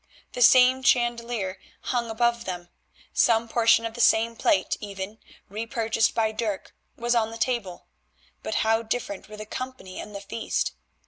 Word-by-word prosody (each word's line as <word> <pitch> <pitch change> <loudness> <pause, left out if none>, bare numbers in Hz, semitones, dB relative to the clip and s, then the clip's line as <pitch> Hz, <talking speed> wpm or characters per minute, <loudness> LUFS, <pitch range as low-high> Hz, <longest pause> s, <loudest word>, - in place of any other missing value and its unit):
The 245 - -4
same 255 +2 +7
chandelier 235 -6 +1 0.2
hung 240 -2 -2
above 235 +1 +1
them, 175 -2 -5 0.4
some 230 0 +3
portion 230 0 +4
of 225 - -4
the 240 - -3
same 230 +1 +4
plate, 315 +5 +2
even, 200 +1 -7 0.3
repurchased 225 +1 0
by 220 -1 +2
Dirk, 215 -3 -4 0.2
was 240 +1 0
on 225 -2 +2
the 225 - -8
table, 225 -7 -2 0.6
but - - -4
how 225 +1 +3
different 220 -3 -4
were 215 - -9
the 215 - -7
company 255 -5 -7
and 210 - -8
the 200 - -5
feast! 225 +3 -2
225 Hz, 155 wpm, -26 LUFS, 210-240 Hz, 0.6 s, same